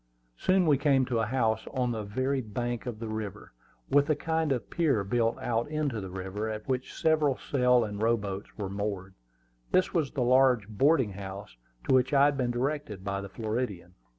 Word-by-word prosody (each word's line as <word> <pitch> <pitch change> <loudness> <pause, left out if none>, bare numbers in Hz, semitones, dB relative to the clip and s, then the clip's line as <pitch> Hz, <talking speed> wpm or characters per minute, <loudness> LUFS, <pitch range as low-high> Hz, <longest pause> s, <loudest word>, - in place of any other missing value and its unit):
Soon 185 - +2
we 145 -4 +4
came 140 -3 +3
to 120 -2 -1
a 115 - 0
house, 110 -3 0
on 125 -2 +1
the 110 -2 -3
very 130 +6 -1
bank 120 +2 -4
of 120 -3 -4
the 115 +1 -6
river, 110 - -6 0.3
with 145 +2 +3
a 155 - +4
kind 160 0 -1
of 125 -6 -1
pier 145 - +2
built 115 +3 +1
out 115 +1 -1
into 150 -8 -1
the 95 - -6
river, 95 +4 -4
at 110 -1 -6
which 130 -1 -2
several 155 -4 +2
sail 125 -3 +3
and 105 -1 -5
row 115 +1 +3
boats 100 -1 -6
were 100 -3 -3
moored. 100 -1 -4 0.6
This 185 - +2
was 160 -6 +1
the 135 -4 -1
large 125 -4 +4
boarding 130 +2 +2
house 95 -4 -8 0.3
to - - +3
which 130 +2 +3
I 140 +1 +6
had 145 0 +2
been 125 -3 0
directed 120 -5 -2
by 100 0 -2
the 100 - -7
Floridian. 105 -5 -4
120 Hz, 200 wpm, -29 LUFS, 105-135 Hz, 0.6 s, I